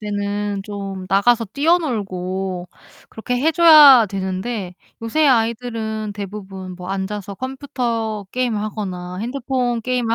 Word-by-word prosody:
때는 205 -1 -3
좀 195 -2 -6
나가서 230 +5 +3
뛰어놀고 195 - -1 0.4
그렇게 245 +3 -3
해 305 +6 +2
줘야 300 -8 +8
되는데 190 0 -4 0.3
요새 300 +7 +2
아이들은 225 -3 0
대부분 195 -2 -7
뭐 180 0 -9
앉아서 195 +1 -4
컴퓨터 240 -4 -3
게임을 245 -4 -1
하거나 185 -4 -5
핸드폰 245 0 -2
게임을 245 -1 0
215 Hz, 280 characters per minute, -20 LUFS, 195-245 Hz, 0.4 s, 줘야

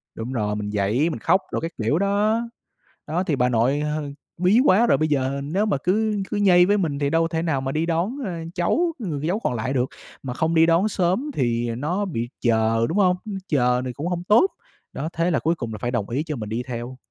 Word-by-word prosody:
Đúng 115 +3 -5
rồi. 105 -4 -1
Mình 105 0 -4
giãy, 105 +10 +1
mình 150 - -4
khóc 190 - +3
đồ - - -1
các 165 +1 -4
kiểu 145 +10 +1
đó. 205 +3 +2 0.7
Đó, 170 +5 0
thì 160 -7 0
bà 125 -1 +2
nội, 125 +5 +2
ờ, 150 -1 -2 0.3
bí 185 +7 +4
quá 220 +6 +5
rồi, - - +4
bây 155 - +1
giờ 140 -1 0
nếu 190 +9 0
mà 200 - +1
cứ 210 +2 +1
cứ - - -2
nhây 180 -3 +5
với 205 +2 +3
mình 155 -7 -1
thì 140 -1 +1
đâu 165 +1 +2
thể 160 -1 -2
nào 155 -5 0
mà 135 0 -2
đi 155 +3 0
đón, 175 - -1
ờ, 190 - -3 0.2
cháu, 330 - +1
người 155 -8 -3
cháu 190 +5 0
còn 175 - -1
lại 120 +3 -2
được. 125 -1 +2 0.4
Mà 125 - -4
không 160 +5 0
đi 160 0 +6
đón 170 +5 +3
sớm 195 - 0
thì 120 - 0
nó 180 +9 -1
bị 120 -9 -3
chờ, 115 -1 +2
đúng 170 - -1
hông? 185 -3 +4
Ư, 215 - -6 0.2
chờ 125 -5 +2
thì 125 - -4
cũng 150 +7 -4
hổng 175 -1 -2
tốt. 215 - +5 0.5
Đó, 155 +4 -3
thế 170 +2 0
là 150 - +2
cuối 165 +2 +1
cùng 120 -7 -5
là 110 - -5
phải 120 +2 -3
đồng 120 -4 -2
ý 135 +6 -1
cho 155 -2 -4
mình 110 -4 -6
đi 115 +3 -2
theo. 120 +1 -6
155 Hz, 250 wpm, -23 LUFS, 125-185 Hz, 0.7 s, đi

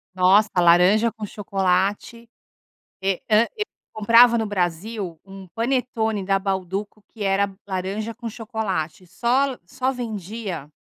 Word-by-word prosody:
Nossa, 190 +4 +5
laranja 180 +6 +5
com 220 -2 -7
chocolate. 200 +3 -1 0.7
Eh 190 -2 0
hã 220 +2 +5
e 425 - 0 0.3
comprava 230 +3 +6
no 220 - -1
Brasil 185 -1 -3
um 195 -1 -11
panetone 225 -1 -1
da 195 0 +2
Bauduco 195 +2 -3
que 220 - -7
era 195 0 +1
laranja 195 +4 -3
com 235 0 -7
chocolate. 205 -7 -4
Só 240 +9 +1
l 255 - -9
só 255 +8 -2
vendia 210 - -5
205 Hz, 125 wpm, -23 LUFS, 190-230 Hz, 0.7 s, comprava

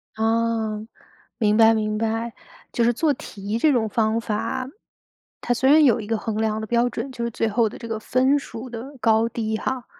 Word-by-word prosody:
啊， 225 -1 0 0.6
明 210 -2 +2
白 225 0 +6
明 215 -1 -1
白。 225 +1 -2 0.4
就 235 - +1
是 240 +1 +3
做 300 +4 +1
题 205 -2 -5
这 300 +4 +3
种 230 -4 +1
方 225 -1 +1
法， 230 +4 -3 0.7
它 245 - 0
虽 265 +3 +2
然 305 +1 +7
有 235 -4 +4
一 205 - -7
个 225 -1 0
衡 215 -1 -4
量 220 0 0
的 220 - -5
标 240 +2 +2
准， 270 - -5
就 235 -2 -5
是 235 - -2
最 225 - -1
后 225 +1 +2
的 - - -10
这 230 - -8
个 220 -1 -3
分 260 +5 +2
数 250 -2 -8
的 255 +4 -8
高 225 0 +3
低 220 -1 -2
哈， 260 0 -3
230 Hz, 220 characters per minute, -23 LUFS, 220-245 Hz, 0.7 s, 然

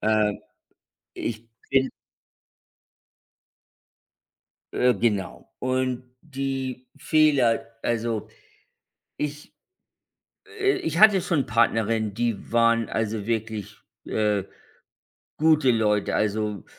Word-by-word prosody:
Ähm, 105 -1 +1 0.7
ich 115 0 -5 0.2
bin 135 -1 +3 2.8
Äh, 125 0 +3
genau. 105 -5 -2
Und 130 0 -1 0.2
die 135 -3 -4
Fehler 145 -7 +3 0.2
also, 115 -2 -1 0.9
ich, 150 0 -5 1.1
äh 400 0 +3
ich 160 +1 -2
hatte 210 -3 +7
schon 160 -8 0
Partnerinnen, 115 -2 +1
die 115 -1 -2
waren, 115 -1 +3
also, 110 -2 -2
wirklich, 110 -2 -3 0.3
äh, 105 -2 0 1.0
gute 155 -4 +4
Leute. 105 -3 +1
Also, 105 -2 -1
115 Hz, 80 wpm, -25 LUFS, 110-135 Hz, 2.8 s, hatte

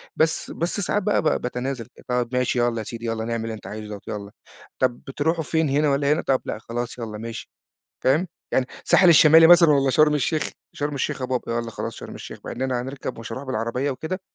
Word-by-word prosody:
بس، 160 0 0
بس 170 +4 -2
ساعات 205 +1 0
بقى 210 - +2
ب-باتنازل 125 -4 -2 0.2
طَب 125 -1 0
ماشي 125 0 +1
يالّا 120 -1 +1
يا - - -3
سيدي، 115 +2 -7
يالّا 115 -1 -2
نعمل 115 -1 -2
اللي 115 0 -4
أنت 110 - -9
عايزه 105 0 -7
دوّة 105 -1 -7
يالّا، 100 -1 -6 0.5
طَب 125 -2 +1
بترُوحوا 160 +4 0
فين 160 0 0
هنا 145 +2 +2
والّا 140 +1 +2
هنا 155 - -1
طَب 130 -1 +1
لأ - - -3
خلاص 120 +2 -5
يالّا 110 -2 -5
ماشي. 115 +1 -7 0.6
فاهم؟ 155 +8 +3 0.2
يعني 130 - +2 0.2
الساحل 185 - +5
الشمالي 160 0 +8
مثلًا 170 -1 +8
والّا 140 -2 +3
شرم 150 +2 +4
الشيخ؟ 150 +2 0 0.2
شرم 145 0 -3
الشيخ 135 - -2
يا 130 - -2
بابا، 125 -2 -2
يالّا 115 0 -2
خلاص 105 - -5
شرم - - -9
الشيخ، - - -9
مع - - -5
إن 125 - -5
أنا 130 -2 0
هنركب 135 +1 -6
ومش 115 - -7
هاروح 135 - -5
بالعربية 125 +2 -1
وكده، 160 +8 -4
130 Hz, 220 wpm, -23 LUFS, 115-150 Hz, 0.6 s, الشمالي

